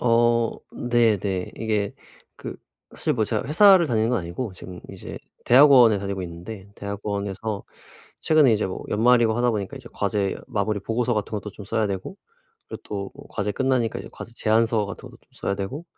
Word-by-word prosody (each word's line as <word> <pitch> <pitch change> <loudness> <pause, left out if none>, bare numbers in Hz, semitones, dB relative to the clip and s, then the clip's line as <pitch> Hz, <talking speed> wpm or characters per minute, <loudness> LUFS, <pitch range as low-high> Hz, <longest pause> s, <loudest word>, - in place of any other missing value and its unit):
어 115 -1 +3 0.2
네네. 105 -6 +1
이게 105 -3 -1 0.4
그 - - -7 0.4
사실 - - 0
뭐 - - +1
제가 - - -2
회사를 185 +3 +6
다니는 115 -3 +1
건 125 - +2
아니고 90 +6 -5
지금 90 0 -10
이제 - - -8 0.3
대학원에 125 -5 +7
다니고 100 -1 -4
있는데 95 +4 -8
대학원에서 100 +1 -4 0.6
최근에 155 -6 +5
이제 105 - 0
뭐 95 - -6
연말이고 115 +1 +4
하다 120 +1 +2
보니까 105 +5 -4
이제 125 - -12
과제 100 -1 -1
마무리 105 -3 -1
보고서 115 +4 -1
같은 105 0 -3
것도 105 -1 -4
좀 105 - -10
써야 110 +1 0
되고 95 -2 -5 0.5
그리고 - - -8
또 100 -2 -5 0.2
과제 105 0 -2
끝나니까 130 -2 0
이제 - - -9
과제 115 - -10
제안서 110 -1 +2
같은 100 - -8
것도 - - -17
좀 - - -33
써야 100 - -2
되고 130 - -5
110 Hz, 375 characters per minute, -24 LUFS, 100-120 Hz, 0.6 s, 대학원에